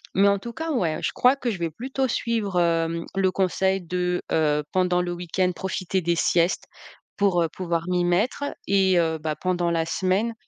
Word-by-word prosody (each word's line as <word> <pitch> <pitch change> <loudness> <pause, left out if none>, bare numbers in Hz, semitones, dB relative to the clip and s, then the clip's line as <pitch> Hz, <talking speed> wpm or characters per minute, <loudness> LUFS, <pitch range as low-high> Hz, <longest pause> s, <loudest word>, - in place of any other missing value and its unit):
mais 200 +1 +5
en 200 0 +3
tout 235 +4 -7
cas 320 +3 -4
ouais, 170 - 0
je - - 0
crois 250 +2 +4
que 250 -3 -2
je 195 - -5
vais 170 -1 -1
plutôt 265 - -2
suivre, 225 -6 -1
hem, 165 -1 +1
le 190 -1 +2
conseil 190 0 +1
de, 180 +1 -1
heu, 150 -2 +2
pendant 180 -1 +2
le 175 - -3
week-end, 180 +1 -1
profiter 190 0 -2
des 170 0 +1
siestes 170 +1 +1 0.5
pour, 185 -4 +2
heu, - - +1
pouvoir 170 -3 -1
m'y 180 -1 +1
mettre 205 +11 +1 0.2
et 190 -2 +3
heu, 160 -1 0
bah, 155 0 -2
pendant 175 +1 -1
la 165 -1 0
semaine, 190 +7 0
180 Hz, 195 wpm, -24 LUFS, 170-195 Hz, 0.5 s, mais